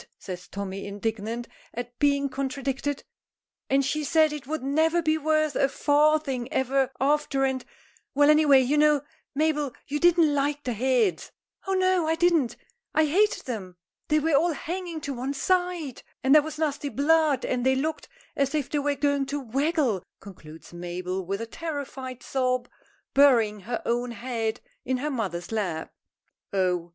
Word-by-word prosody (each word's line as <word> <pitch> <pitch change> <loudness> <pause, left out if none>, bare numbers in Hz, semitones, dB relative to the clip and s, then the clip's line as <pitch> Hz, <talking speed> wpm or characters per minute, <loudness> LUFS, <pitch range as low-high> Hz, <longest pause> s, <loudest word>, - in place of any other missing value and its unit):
says 180 -1 -8
Tommy, 195 0 -5
indignant 220 +3 -3 0.3
at 245 +1 -6
being 280 -1 +3
contradicted, 275 +1 -3 0.7
"and 270 0 +3
she 305 +3 -1
said 310 +1 +3
it 290 -4 -7
would 310 -2 -3
never 315 +5 +2
be 315 -2 +2
worth 310 -1 +1
a 275 - +3
farthing 290 -3 +2
ever 265 0 +1
after, 280 0 +1
and 260 -1 -1 0.5
Well, 290 +1 +6
any 305 +1 +5
way, 275 -3 +6
you 280 +4 +2
know, 300 -2 +4 0.3
Mabel, 300 -3 +1
you 295 +1 -2
didn't 335 -3 +4
like 290 +1 0
the 250 - -2
heads." 230 -6 +1 0.4
"Oh, 385 - +1
no; 370 -3 +2
I 320 - +2
didn't 330 -7 +2 0.4
I 315 - +5
hated 400 +8 +2
them! 190 -8 -6 0.3
They 305 - +3
were 310 +1 +1
all 325 +4 +3
hanging 345 +1 -5
to 280 -1 -4
one 260 +3 -3
side; 355 -5 0 0.2
and 265 +1 +4
there 305 - +8
was 310 0 -7
nasty 290 -2 -1
blood, 290 +1 +2
and 250 -1 -1
they 265 +1 +3
looked 310 +4 -3 0.3
as 275 +1 0
if 295 -4 -2
they 295 - +1
was 285 0 0
going 280 -1 +1
to 290 +1 -2
waggle," 270 - 0 0.2
concludes 165 -5 -13
Mabel, 180 +2 -4
with 195 +4 -3
a - - -3
terrified 270 -3 -6
sob, 255 -2 0 0.5
burying 235 -7 +5
her 235 +5 -4
own 240 +1 0
head 230 -2 -3 0.2
in 260 0 -1
her 295 +4 -2
mother's 190 -9 -3
lap. 185 -8 -3 0.6
"Oh! 180 -3 0
275 Hz, 165 wpm, -26 LUFS, 240-305 Hz, 0.7 s, there